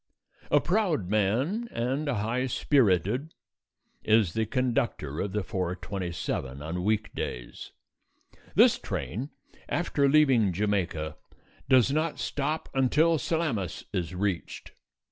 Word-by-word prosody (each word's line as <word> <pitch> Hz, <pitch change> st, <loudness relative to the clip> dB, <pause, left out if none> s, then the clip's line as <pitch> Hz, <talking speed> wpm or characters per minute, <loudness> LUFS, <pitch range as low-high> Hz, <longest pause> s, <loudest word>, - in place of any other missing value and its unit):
A -, -, +5 dB
proud 175 Hz, -, 0 dB
man, 125 Hz, -, +1 dB
and 130 Hz, +6 st, -1 dB
a 140 Hz, -, 0 dB
high 115 Hz, +5 st, -1 dB
spirited, 125 Hz, -, +1 dB, 0.7 s
is 110 Hz, -6 st, +3 dB
the 110 Hz, -1 st, 0 dB
conductor 115 Hz, -, -1 dB
of 100 Hz, -, -2 dB
the 105 Hz, 0 st, -1 dB
4:27 90 Hz, -6 st, -3 dB
on 80 Hz, +4 st, -4 dB
weekdays. 105 Hz, -, -3 dB, 0.8 s
This -, -, +6 dB
train, 110 Hz, -, -4 dB, 0.4 s
after 145 Hz, -5 st, +1 dB
leaving 135 Hz, -10 st, +4 dB
Jamaica, 90 Hz, -6 st, -1 dB, 0.5 s
does 130 Hz, 0 st, +5 dB
not 155 Hz, +2 st, 0 dB
stop 150 Hz, +3 st, -2 dB
until 150 Hz, +5 st, +3 dB
Salamis 135 Hz, -, -2 dB
is 90 Hz, -3 st, -2 dB
reached. 95 Hz, -2 st, -3 dB
110 Hz, 105 wpm, -28 LUFS, 90-140 Hz, 0.8 s, This